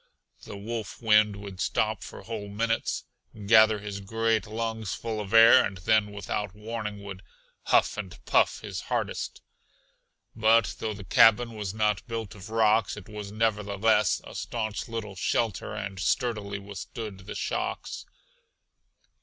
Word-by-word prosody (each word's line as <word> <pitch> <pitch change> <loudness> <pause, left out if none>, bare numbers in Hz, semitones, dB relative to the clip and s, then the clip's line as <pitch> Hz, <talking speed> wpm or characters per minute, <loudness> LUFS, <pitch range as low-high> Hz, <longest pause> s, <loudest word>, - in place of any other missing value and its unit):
The 100 - -8
wolf 110 +1 -5
wind 105 -2 +4
would 100 -2 -8
stop - - 0
for - - -9
whole 110 -3 -5
minutes, 115 +3 -1 0.4
gather 110 0 +6
his 100 -1 -6
great 110 +1 0
lungs 110 -1 -3
full 110 -2 -4
of 100 -1 -7
air 115 +3 +8
and 95 - -3
then 105 +2 +2
without 100 -1 -4
warning 105 -1 -5
would 95 -2 -8 0.4
"huff - - +3
and 95 -4 -6
puff" - - +3
his - - -5
hardest. - - -3 0.9
But 110 0 +3
though 110 -1 -3
the 100 - -9
cabin 115 +5 +5
was 105 -2 -5
not 105 -3 0
built 115 -5 -4
of 95 0 -11
rocks, 110 -2 +2
it 100 - -10
was 105 -1 -7
nevertheless 105 -1 +2
a - - -10
staunch 110 -3 -3
little 110 -4 -5
shelter 110 +3 -1
and 95 -1 -5
sturdily 105 0 -1
withstood 100 0 -8
the - - -6
shocks. - - -3
105 Hz, 145 wpm, -27 LUFS, 100-115 Hz, 0.9 s, air